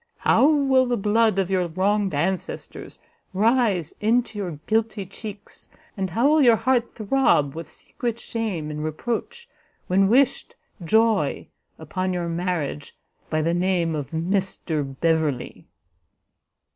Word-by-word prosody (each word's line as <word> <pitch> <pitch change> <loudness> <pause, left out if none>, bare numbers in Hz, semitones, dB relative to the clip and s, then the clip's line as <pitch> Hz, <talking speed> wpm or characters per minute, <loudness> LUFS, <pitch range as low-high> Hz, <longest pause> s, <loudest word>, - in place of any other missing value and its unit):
How 275 - +4
will 270 -4 +3
the 245 -1 0
blood 215 0 +2
of 195 -1 0
your 180 -2 +1
wronged 195 +1 0
ancestors 180 +5 -4 0.4
rise 210 - +2
into 225 0 +1
your 175 -6 -4
guilty 220 -2 0
cheeks, 205 +1 -10 0.3
and 190 -2 -2
how 230 +10 +2
will 305 +1 +4
your 240 -4 +6
heart 240 +1 0
throb 215 - +2
with 165 -1 -8
secret 235 -1 -5
shame 200 -12 -4
and 150 0 -5
reproach, 235 - -4 0.4
when 195 +1 +3
wished 265 +4 +2 0.3
joy 220 +5 +1 0.3
upon 185 0 -3
your 175 -1 -2
marriage 165 -5 -3 0.3
by 155 -1 0
the 165 +2 +1
name 175 -2 +1
of 145 -4 -4
Mr 165 -5 -2
Beverley!" 160 -6 -1
195 Hz, 130 wpm, -23 LUFS, 165-230 Hz, 0.4 s, your